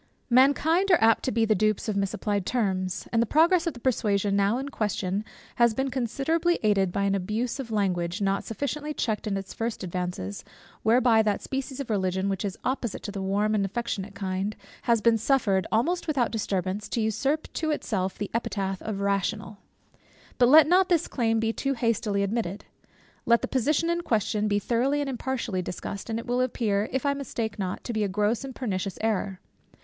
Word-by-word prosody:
Mankind 300 +9 +4
are 355 - +7
apt 225 0 +4
to 260 - 0
be 230 -2 +2
the 220 - +3
dupes 215 +2 +1
of 215 - -1
misapplied 200 0 -1
terms; 190 -5 -1
and 230 - +4
the 235 - +1
progress 335 - +4
of 335 - -2
the - - -9
persuasion 205 -5 +1
now 200 +3 +2
in 275 +2 -4
question, 205 -5 -2 0.3
has 235 -2 +4
been 265 +1 -1
considerably 275 +8 0
aided 195 -3 +3
by 200 +2 -1
an 200 0 +2
abuse 215 +7 -2
of 260 -4 -5
language, 180 -5 0
not 195 -1 0
sufficiently 295 +5 -4
checked 215 -2 -1
in 200 -2 0
its 195 0 -6
first 230 -2 -3
advances, 180 - -4 0.4
whereby 230 0 +4
that 210 -2 0
species 270 0 -4
of 270 -5 -4
Religion 190 -1 0
which 195 0 -2
is 200 -3 -3
opposite 250 -5 -2
to 205 - -4
the 195 -1 -5
warm 205 +3 +1
and 210 -2 +2
affectionate 200 -1 -3
kind, 195 +1 -2 0.3
has 235 -3 +2
been 230 0 +4
suffered 210 -6 +2
almost 340 +12 +1
without 270 -6 +1
disturbance, 200 -2 -2
to - - -1
usurp 270 +8 0
to 315 - -1
itself 195 -10 -1
the 205 - -4
epithet 195 -4 -2
of 205 -3 -4
rational. 200 +1 -1 0.8
But 245 -1 +6
let 310 +2 +9
not 365 +4 +4
this 345 -2 +2
claim 225 -3 +1
be 225 0 0
too 275 +2 -1
hastily 220 -4 0
admitted. 200 -2 -2 0.6
Let 235 0 +4
the - - 0
position 290 +6 +1
in 340 0 0
question 215 - 0
be 205 -1 +2
thoroughly 245 +7 +1
and 285 - -2
impartially 245 -6 -2
discussed, 195 +4 -6
and 225 - -1
it 230 - -5
will 245 +1 0
appear, 220 -4 0
if 265 +2 -2
I 280 - +3
mistake 235 -6 -4
not, 185 -2 -3
to 240 - -4
be 215 -1 0
a - - +1
gross 210 +5 0
and 270 -1 -7
pernicious 195 -6 -3
error. 205 -4 -1
220 Hz, 195 wpm, -26 LUFS, 200-255 Hz, 0.8 s, let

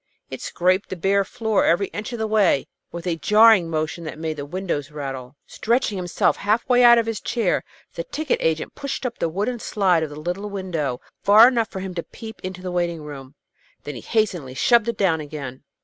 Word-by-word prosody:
It - - -6
scraped 185 +3 0
the - - -4
bare 195 +3 +2
floor 220 +1 0
every 175 +4 +3
inch 210 +4 -6
of 240 - -4
the 220 - -1
way, 210 -10 +2 0.3
with 170 0 -7
a 170 -2 -1
jarring 210 0 +5
motion 160 +1 -2
that 155 - -6
made 160 -1 -4
the 145 0 -6
windows 175 -4 -3
rattle. 135 -3 -6
Stretching 235 -2 0
himself 180 -2 0
half 215 +3 0
way 250 -1 +4
out 235 -1 +8
of 230 - +2
his 225 -3 -3
chair, 225 -7 0 0.3
the 170 - -4
ticket 310 - -2
agent 160 -1 -1
pushed 280 -1 -5
up 240 - -4
the 165 - 0
wooden 210 +8 -2
slide 190 -6 +1
of 160 - -2
the 145 +1 -9
little 180 +6 -4
window 170 -10 -3 0.2
far 215 +4 +8
enough 235 -3 +1
for 190 - -6
him 190 -1 -5
to 170 - -3
peep 220 +5 -11
into 185 0 -6
the 180 - -4
waiting 170 -3 -1
room. 140 -2 -10 0.5
Then 145 - -6
he 120 - -8
hastily 180 - -1
shoved 235 - +3
it 235 -2 -2
down 165 -6 +2
again. 140 -4 -7
185 Hz, 210 wpm, -22 LUFS, 160-220 Hz, 0.5 s, out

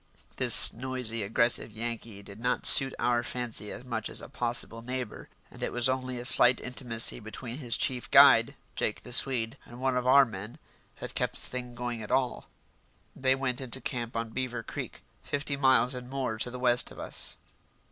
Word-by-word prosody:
This - - +8
noisy, 125 -2 -2
aggressive 115 +3 +2
Yankee 115 -2 -7
did 100 +1 -12
not 125 +2 -1
suit 135 -1 +8
our 120 0 +1
fancy 120 -4 -5
much 115 -4 -5
as - - -4
a - - -8
possible 120 -3 -3
neighbour, 125 +1 -6 0.2
and - - -14
it - - -2
was 120 0 +1
only 130 -1 -3
a 120 - -7
slight 125 -1 +4
intimacy 120 -2 -1
between 115 +4 -8
his 120 -5 -1
chief 125 -2 -1
guide, - - +6 0.2
Jake - - -3
the 125 - -10
Swede, 125 -1 +2
and 120 +1 -13
one 130 0 -1
of 125 0 -1
our 140 +1 +6
men 105 -1 -9 0.4
that - - -7
kept - - -2
the - - -9
thing 125 -1 -6
going 120 -2 -5
at 105 - -9
all. 130 -2 -1 0.7
They 130 0 +2
went 130 -1 -3
into 130 0 -1
camp 120 -3 -5
on 115 -1 -4
Beaver 125 -1 -4
Creek, - - -8 0.2
fifty 145 0 -3
miles 130 -2 +3
and 125 -1 -8
more 130 -5 -4
to 125 - -1
the 125 - -7
west 125 -1 +2
of - - -14
us. - - -4
125 Hz, 190 wpm, -28 LUFS, 115-130 Hz, 0.7 s, This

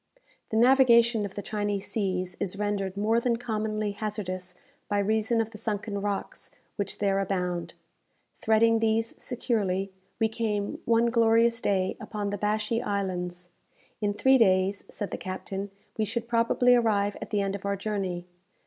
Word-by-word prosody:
The 220 - -1
navigation 235 -3 +5
of 190 - -15
the 205 - -5
Chinese 205 -2 -2
seas 185 -4 -1
is 195 -1 -2
rendered 200 -2 -2
more 220 +3 +2
than 235 0 +1
commonly 215 -3 -2
hazardous 185 -4 -4 0.3
by 205 - +1
reason 220 +3 +1
of 225 0 -1
the 215 - -10
sunken 205 -1 -3
rocks 200 -1 -3 0.3
which 200 -2 -3
there 195 -1 +1
abound. 180 -3 -2 0.6
Threading 225 +1 +3
these 225 0 +1
securely, 200 -6 -1 0.3
we 225 - +3
came, 215 -3 -2
one 235 0 +3
glorious 230 0 +4
day, 190 -2 0
upon 205 -2 -3
the 205 - -3
Bashee 215 +2 0
Islands. 180 -3 -3 0.5
In 205 -1 0
three 265 +5 +5
days, 190 -2 +3
said 205 - -5
the - - -4
captain, 195 +1 -5 0.3
we 215 - +2
should 230 +2 -3
probably 235 +1 +3
arrive 205 -4 +2
at - - -6
the 205 -2 +1
end 195 0 -1
of 200 - -8
our 200 0 0
journey. 195 -4 -3
210 Hz, 155 wpm, -27 LUFS, 195-225 Hz, 0.6 s, navigation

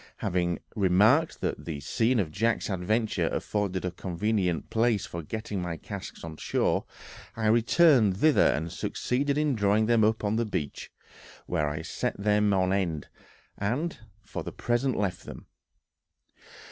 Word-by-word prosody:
Having 85 -1 0 0.2
remarked 110 - +3
that - - -3
the 80 -4 -4
scene 115 - +1
of 85 -7 -1
Jack's 115 +4 0
adventure 105 +4 0
afforded 100 -3 -2
a 90 - -1
convenient 90 -1 -1
place 115 -2 +2
for 85 - -6
getting 105 +3 -4
my 85 -2 -4
casks - - -8
on 80 -1 -7
shore, - - 0 0.5
I 110 - -3
returned 115 - +4
thither 155 +6 +5
and 80 +3 -1
succeeded 140 +3 -1
in 150 -2 +2
drawing 105 -1 +2
them 115 -1 +3
up 110 +1 +2
on 105 +1 +1
the 115 - +2
beach, 75 -9 -4 0.6
where 75 -1 0
I 75 +2 -4
set - - -3
them 105 0 +2
on 95 -1 +2
end, 85 -7 -1 0.5
and 125 +10 -2 0.2
for - - -6
the - - -6
present 120 +2 0
left 95 -3 -2
them. - - -9
105 Hz, 150 wpm, -28 LUFS, 90-115 Hz, 0.6 s, thither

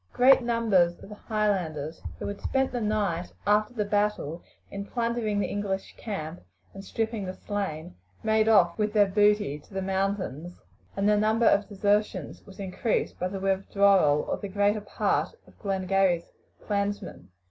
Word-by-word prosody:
Great 260 +2 +6
numbers 220 -8 +2
of - - -11
the - - -8 0.2
Highlanders, 180 -8 -1 0.2
who - - -6
had 200 0 -5
spent 265 0 0
the 245 -1 -3
night 205 -5 -1
after 210 +3 +2
the 210 -3 0
battle 205 -6 -1 0.3
in 200 0 -5
plundering 230 -1 -1
the - - +1
English 200 -1 -3
camp 175 -6 -6 0.3
and 195 - -9
stripping 220 +1 -2
the 185 0 -5
slain, 180 -5 -4 0.3
made 220 0 +3
off 185 -4 +4
with 210 0 0
their 210 -2 +5
booty 205 -6 +2
to 150 - -20
the 190 - -1
mountains, 190 -4 -2 0.4
and 200 +1 +1
the 210 - +5
number 220 +2 +2
of 200 -1 +3
desertions 205 +1 0
was 195 - -14
increased 195 +4 -2
by 180 - 0
the 195 +1 -5
withdrawal 195 -5 +3
of - - -2
the 200 - -4
greater 205 +2 +1
part 205 - -1
of - - -21
Glengarry's 190 -3 +1 0.3
clansmen. 200 - -3
200 Hz, 160 wpm, -27 LUFS, 185-210 Hz, 0.4 s, Great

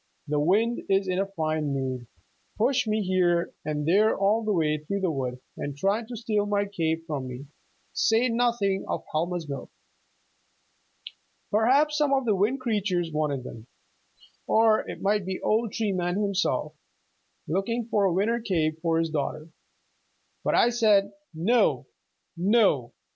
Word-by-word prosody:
The 150 0 0
wind 215 +10 +2
is 195 0 +2
in 185 0 0
a 195 - 0
fine 155 -6 -2
mood 130 -3 -3 0.5
pushed 250 +2 +2
me 215 0 0
here 180 -2 +1
and 150 -1 -3
there 210 +6 +4
all 205 +3 +2
the 215 - 0
way 155 -5 +1
through 200 +7 -4
the 185 -3 +1
wood, 130 -3 -3 0.2
and 145 -1 -5
tried 205 +7 0
to 245 - -7
steal 215 -3 -1
my 205 0 +1
cape 165 -4 -2
from 145 -5 -4
me, 125 +2 -8 0.5
say 225 +3 +3
nothing 230 -5 +1
of - - -3
Helma's 170 +1 -2
milk! 140 -2 -6 1.8
Perhaps 275 +8 +3
some 290 -2 +2
of 265 -1 0
the 220 - +3
Wind 210 +8 +1
Creatures 195 -8 -1
wanted 150 -4 -1
them, 115 -2 -10 0.8
or 220 -1 +3
it - - -7
might 205 0 +2
be 185 0 -4
old 220 0 0
Tree 220 -3 -1
Man 175 -1 -1
himself, 195 -6 0 0.7
looking 220 +8 -1
for 210 -4 +2
a 190 - +3
winter 210 +7 +1
cape 160 -7 -1
for 165 -1 +1
his 165 -1 0
daughter. 155 +1 -3 0.9
But - - +1
I 240 - +5
said, 210 -4 +3 0.2
'No, 215 +10 +2 0.5
no. 180 - +2
195 Hz, 155 wpm, -26 LUFS, 155-220 Hz, 1.8 s, I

